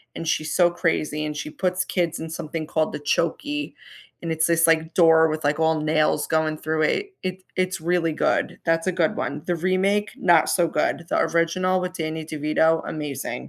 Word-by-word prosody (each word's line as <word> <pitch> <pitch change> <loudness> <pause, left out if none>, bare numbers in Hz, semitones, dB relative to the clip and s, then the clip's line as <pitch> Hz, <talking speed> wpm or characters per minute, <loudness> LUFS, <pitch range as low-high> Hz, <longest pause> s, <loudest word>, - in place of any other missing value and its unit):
and 165 - -5
she's 155 -1 -1
so 175 -1 +4
crazy, 155 -3 -1
and 150 -1 -4
she 150 - -5
puts 185 0 -1
kids 170 -3 -1
in 160 0 -6
something 155 0 -5
called 155 -1 0
the - - -4
"Chokey," 290 - -1 0.5
and 165 - -3
it's 160 +1 +1
this, 170 0 +3
like, 160 0 +2
door 160 -2 +5
with, 155 0 -3
like, 150 +2 +1
all 160 -1 +2
nails 155 0 +1
going 155 -1 0
through 155 0 -2
it. 395 - 0
It 185 0 -4
it's 185 -1 0
really 170 -1 +1
good, - - 0
that's 165 +2 +1
a - - +3
good 170 -3 0
one. 145 +1 -3
The 175 - 0
remake, 190 +4 +1
not 175 -4 +4
so 175 -2 +2
good; 170 - -1
he - - 0
original 185 +2 +1
with 180 0 -4
Danny 160 -1 -4
DeVito, 155 +1 +1
amazing. 150 -4 -4
165 Hz, 195 wpm, -23 LUFS, 155-180 Hz, 0.5 s, door